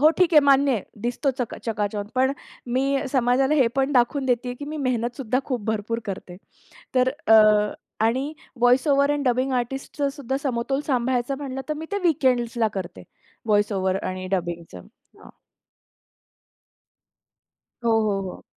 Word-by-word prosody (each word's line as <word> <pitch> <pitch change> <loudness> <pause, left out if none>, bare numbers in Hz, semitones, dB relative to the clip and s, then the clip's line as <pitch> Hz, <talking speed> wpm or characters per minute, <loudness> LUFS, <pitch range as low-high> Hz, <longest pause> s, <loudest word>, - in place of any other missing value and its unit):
हो 305 +2 +7
ठीक 360 -3 +3
आहे 300 - +9
मान्य 275 0 +5
आहे 220 -6 -1 0.2
दिसतो 245 +4 0
चका 245 -3 -3
चकाचौंध 205 -2 -2
पण 260 +1 +3 0.3
मी 270 +3 +1
समाजाला 260 +2 +2
हे 270 -5 +4
पण 270 +2 +1
दाखवून 265 +2 +2
देते, 245 0 0
की 285 +3 -8
मी 305 +1 -6
मेहनत 245 -3 -1
सुद्धा 255 -1 0
खूप 245 -6 -3
भरपूर 220 +1 -2
करते. 185 -2 -6 0.6
तर 255 0 +4 0.2
अ, 220 0 +8 0.7
आणि 260 +6 0 0.3
व्हॉईस 250 +4 +4
ओव्हर 280 0 +3
एंड 290 -1 -1
डबिंग 255 +2 +1
आर्टिस्टचं 270 +3 -2
सुद्धा 270 -2 -3
समतोल 270 +1 -1
सांभाळायचं 255 0 0
म्हटलं 270 -2 -5
तर 305 - +1
मी 315 +2 -6
ते 405 - 0
वीकेंड्सला 245 -7 +2
करते 175 - -6 0.4
व्हॉईस 205 -1 +2
ओव्हर 190 0 0
आणि 185 0 -4
डबिंगचं, 170 - -3 0.4
हां. - - -15 2.6
हो, 230 - +3
हो, 200 -2 0
हो. - - -10
250 Hz, 150 wpm, -24 LUFS, 225-275 Hz, 2.6 s, आहे